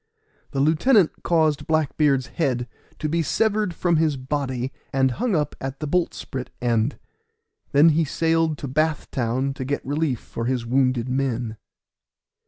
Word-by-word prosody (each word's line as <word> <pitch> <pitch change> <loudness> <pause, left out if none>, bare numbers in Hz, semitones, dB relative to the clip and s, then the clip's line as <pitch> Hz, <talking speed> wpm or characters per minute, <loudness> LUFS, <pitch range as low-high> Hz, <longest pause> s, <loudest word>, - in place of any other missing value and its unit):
The 135 - -3
lieutenant 165 - +3
caused 160 -3 +1
Black 155 -3 +1
beard's 140 -4 +3
head 125 -1 -1 0.3
to 155 - -2
be 165 +2 +1
severed 210 +3 +1
from 170 -1 +2
his 155 -3 +2
body, 130 -1 -2 0.2
and 130 -1 +2
hung 225 - 0
up 150 -2 -1
at 135 +1 -5
the 150 - -3
boltsprit 145 -6 -2
end; 120 +1 +1 0.7
then 145 +4 +6
he 160 +1 +3
sailed 160 +1 +1
to 140 - -5
Bath 155 +3 0
Town, 130 +2 -1
to 135 - -5
get 145 +2 -3
relief 145 -3 0
for 115 - -6
his 125 -1 -1
wounded 130 -1 +1
men. 125 -4 -1
140 Hz, 155 wpm, -23 LUFS, 130-160 Hz, 0.7 s, then